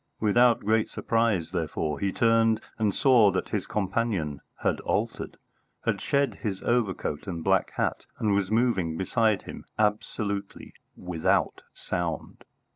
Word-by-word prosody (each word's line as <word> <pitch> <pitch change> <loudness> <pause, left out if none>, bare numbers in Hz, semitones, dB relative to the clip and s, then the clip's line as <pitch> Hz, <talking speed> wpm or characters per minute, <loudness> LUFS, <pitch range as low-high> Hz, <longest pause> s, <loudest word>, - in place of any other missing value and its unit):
Without 120 +3 +4
great 110 +1 +1
surprise, 115 -8 0
therefore, 75 -2 -2
he 100 - 0
turned 115 0 +3 0.2
and 105 -2 +2
saw 120 -1 +5
that 95 -1 -2
his 100 -3 -2
companion 95 -8 -1 0.2
had - - +1
altered, - - -2 0.5
had - - 0
shed 140 0 0
his 100 -5 -2
overcoat 105 -9 -1
and 85 -4 -4
black - - +2
hat, - - -1
and 105 -2 +1
was 100 -1 +1
moving 105 -8 +1
beside 110 +2 +1
him - - -9
absolutely 105 -1 -2 0.2
without 90 -3 0
sound. 85 -3 -4
105 Hz, 130 wpm, -27 LUFS, 95-115 Hz, 0.5 s, saw